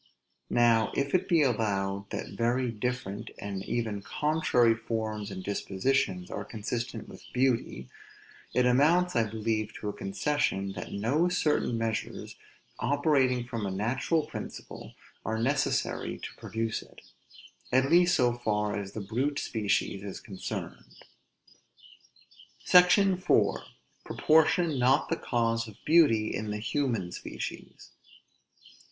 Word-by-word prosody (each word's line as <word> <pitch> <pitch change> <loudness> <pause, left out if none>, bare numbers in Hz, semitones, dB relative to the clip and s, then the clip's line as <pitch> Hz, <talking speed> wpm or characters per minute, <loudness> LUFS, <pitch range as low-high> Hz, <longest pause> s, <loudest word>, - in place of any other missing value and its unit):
Now, 115 -2 +3
if 140 0 -1
it 185 - +1
be 165 -4 +5
allowed 100 -5 -1
that - - -5
very 120 +1 0
different, 110 -2 -4
and 100 -2 -5
even 110 -3 -2
contrary 125 -1 +2
forms 110 -2 -3
and 95 -1 -7
dispositions 95 -1 -1
are - - -4
consistent 115 +3 -4
with - - -12
beauty, 125 - 0 0.6
it 125 - +2
amounts 155 +8 +3
I 115 -2 +2
believe 110 0 -2
to 105 - -4
a - - -4
concession, 100 -1 -1
that - - -7
no 135 - +1
certain 150 -8 +1
measures, 115 -1 -3 0.4
operating 135 -4 +2
from 115 -4 -4
a - - -2
natural 125 - 0
principle, 155 - -8 0.3
are 110 - -2
necessary 130 +6 0
to - - -8
produce 115 0 -3
it; - - -16 0.7
at 130 +3 +3
least 175 +1 +5
so 125 -4 +3
far 105 -3 -1
as 100 -1 -5
the 110 - -4
brute 130 +8 -1
species 105 -5 -1
is 100 -2 -6
concerned. 95 -3 -7 1.7
SECTION 180 +1 +6
IV. 180 - +3 0.5
PROPORTION 160 -1 +3
NOT 130 +2 +3
THE - - 0
CAUSE 115 -1 0
OF 110 - -12
BEAUTY 145 -10 +4
IN 110 - -3
THE 105 - -2
HUMAN 115 -4 -1
SPECIES. - - -7
115 Hz, 125 wpm, -29 LUFS, 105-140 Hz, 1.7 s, SECTION